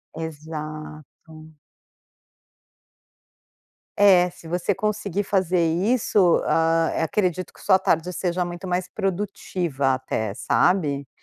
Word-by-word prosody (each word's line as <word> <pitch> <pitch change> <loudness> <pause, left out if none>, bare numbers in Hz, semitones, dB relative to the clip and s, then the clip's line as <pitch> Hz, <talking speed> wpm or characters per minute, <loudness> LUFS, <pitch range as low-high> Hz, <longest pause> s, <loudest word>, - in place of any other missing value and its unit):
Exato. 155 0 -8 2.4
É, 185 -3 +5
se 165 - -14
você 180 +4 0
conseguir 205 -1 -2
fazer 185 -3 +1
isso, 190 0 +2
hã, 165 0 +2
eh, - - 0
acredito 185 +1 -1
que - - -17
sua 190 -2 +4
tarde 180 -1 0
seja 180 0 -1
muito 175 +1 -6
mais 180 0 -1
produtiva 180 -8 -2
até, 110 -5 -3
sabe? 145 - +1
175 Hz, 100 wpm, -23 LUFS, 155-190 Hz, 2.4 s, É